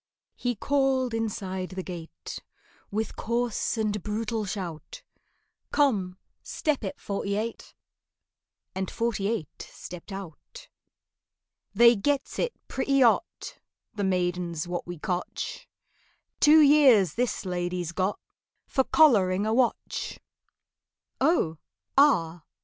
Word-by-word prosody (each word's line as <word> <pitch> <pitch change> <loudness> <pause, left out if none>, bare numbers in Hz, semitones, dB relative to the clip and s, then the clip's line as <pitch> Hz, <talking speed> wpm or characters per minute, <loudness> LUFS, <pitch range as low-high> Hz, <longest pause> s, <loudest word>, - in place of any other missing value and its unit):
He 245 -1 -2
called 265 0 +1
inside 195 -5 -3
the 185 0 -5
gate 170 -3 -8 0.5
With 215 +1 -3
coarse 235 0 -1
and 210 -2 -1
brutal 215 +2 -2
shout, 190 - -6 0.7
"Come, 200 -11 +1 0.2
step 300 -6 -2
it, 195 - -5
Forty 200 0 -3
eight!" 225 +2 -5 1.0
And 190 0 -3
Forty 230 -4 -1
eight 215 -9 -4
stepped 180 +3 -10
out. 195 - -9 1.1
"They 235 +2 +7
gets 280 +6 -1
it 485 - 0
pretty 275 +1 +1
hot, 245 +8 +1 0.3
The 205 - -3
maidens 175 -3 -1
what 175 0 -4
we 175 0 -6
cotch— 180 +3 -4 0.7
Two 310 +1 +7
years 270 - +6
this 240 -4 -1
lady's 175 -1 -2
got 185 +3 -1 0.5
For 265 - +1
collaring 205 - +4
a 220 - +1
wotch." 245 0 -1 1.0
"Oh, 260 - +2 0.4
ah! 175 - +4
210 Hz, 110 wpm, -27 LUFS, 180-250 Hz, 1.1 s, They